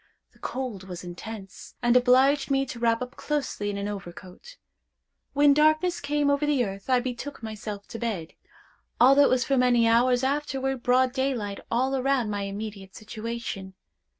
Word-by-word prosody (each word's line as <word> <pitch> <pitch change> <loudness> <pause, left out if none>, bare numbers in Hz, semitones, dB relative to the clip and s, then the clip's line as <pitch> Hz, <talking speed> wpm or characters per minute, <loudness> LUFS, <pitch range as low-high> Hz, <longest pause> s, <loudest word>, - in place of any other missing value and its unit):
The - - -26
cold 245 -8 -5
was 180 -1 -7
intense, 195 +3 -9
and 240 0 +2
obliged 260 +3 +4
me 270 0 +2
to 245 -2 -8
wrap 230 0 +1
up 250 +2 -10
closely 275 -8 -2
in 200 - -3
an 200 0 -3
overcoat. 195 - -9 0.8
When 285 0 +5
darkness 310 +4 +3
came 290 0 0
over 285 +1 +1
the 290 -5 +2
earth, 195 +3 -8
I 255 -1 +4
betook 255 +2 -6
myself 215 -2 -6
to 230 - -7
bed, 200 -9 -3 0.7
although 275 +3 +7
it - - +3
was 255 -1 +2
for 275 - +1
many 245 -2 +4
hours 245 +2 +3
afterward 270 -2 -1
broad 250 +1 +3
daylight 255 -7 -2
all 260 +3 +1
around 260 -4 +1
my 205 -1 -2
immediate 200 -1 -7
situation. 215 -3 -6
245 Hz, 165 wpm, -26 LUFS, 210-270 Hz, 0.8 s, although